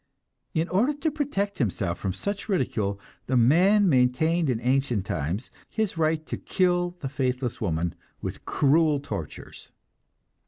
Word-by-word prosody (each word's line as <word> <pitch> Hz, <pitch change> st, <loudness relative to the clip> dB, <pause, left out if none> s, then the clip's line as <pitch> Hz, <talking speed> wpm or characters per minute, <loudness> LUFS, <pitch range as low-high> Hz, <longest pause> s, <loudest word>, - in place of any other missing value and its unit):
In 160 Hz, +1 st, +1 dB
order 230 Hz, +11 st, +2 dB
to 305 Hz, +2 st, -1 dB
protect 260 Hz, -10 st, -2 dB
himself 95 Hz, -7 st, -1 dB
from 95 Hz, -, -1 dB
such 200 Hz, -, -4 dB
ridicule, 105 Hz, -, 0 dB, 0.3 s
the 130 Hz, -, +2 dB
man 185 Hz, -, +5 dB
maintained 150 Hz, +4 st, +3 dB
in 120 Hz, -3 st, 0 dB
ancient 125 Hz, -5 st, +1 dB
times 90 Hz, -, -3 dB, 0.2 s
his 220 Hz, -5 st, -1 dB
right 160 Hz, -1 st, +1 dB
to -, -, -4 dB
kill 175 Hz, -2 st, +1 dB
the 135 Hz, -, -2 dB
faithless 130 Hz, -2 st, -2 dB
woman 85 Hz, -4 st, -1 dB, 0.3 s
with -, -, -6 dB
cruel 150 Hz, +1 st, +3 dB
tortures. 100 Hz, -, -7 dB
140 Hz, 135 wpm, -26 LUFS, 115-180 Hz, 0.3 s, man